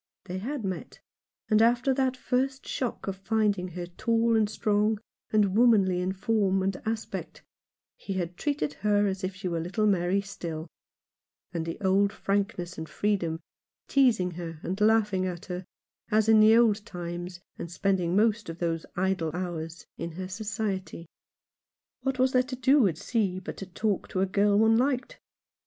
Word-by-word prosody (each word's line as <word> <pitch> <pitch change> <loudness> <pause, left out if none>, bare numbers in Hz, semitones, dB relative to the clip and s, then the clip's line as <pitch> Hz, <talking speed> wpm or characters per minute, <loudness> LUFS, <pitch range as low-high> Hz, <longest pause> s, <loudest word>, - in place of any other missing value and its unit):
They 185 +1 -4
had 250 +2 -4
met, 190 -2 -5 0.5
and 215 -1 +4
after 240 +3 +4
the 260 -1 +2
first 265 +1 -1
shock 250 -3 -3
of 195 -1 -3
find 210 +1 +1
ing 180 - -4
her 175 0 -6
tall 230 +6 +1
and 215 -2 +3
strong, 210 0 +1 0.3
and 205 -3 +2
womanly 205 -6 +4
in 185 +1 0
form 195 -1 +1
and 195 0 0
aspect, 225 0 -4 0.5
he 195 - -5
had 180 -2 -3
treated 290 +5 -1
her 205 -1 +3
as 195 -1 -2
if 185 0 -2
she 190 0 -5
were 170 -2 -1
little 185 +6 -1
Mary 190 -1 +2
still 170 -5 -5 0.4
— - - -50
with 165 -1 -2
the 165 - -5
old 200 +1 +3
frankness 195 -4 -2
and 160 - -6
freedom; 175 -6 -1 0.5
teasing 235 -10 +3
her, 165 -2 -7
and 190 +4 -3
laughing 210 -3 +3
at 175 -2 -5
her, 180 -1 -5 0.4
as 215 0 +3
in 220 -1 +7
the 220 +1 +7
old 220 -3 +4
times, 175 -1 -6 0.2
and 170 - -5
spending 180 -2 0
most 220 -1 +2
of 165 - -6
those 165 -2 -2
idle 185 -3 0
hours 170 -2 -5
in 170 - -4
her 185 +2 -5
society. 200 -3 -4 1.0
What 270 -1 -1
was 255 0 +3
there 255 - +4
to 255 +1 -5
do 260 -1 +4
at 160 -4 -2
sea 200 -3 0
but 190 - -7
to 195 - -7
talk 200 +2 -1
to 185 - -2
a - - +4
girl 200 +1 +2
one 225 +1 +5
liked 265 - -1
200 Hz, 175 wpm, -28 LUFS, 180-225 Hz, 1.0 s, in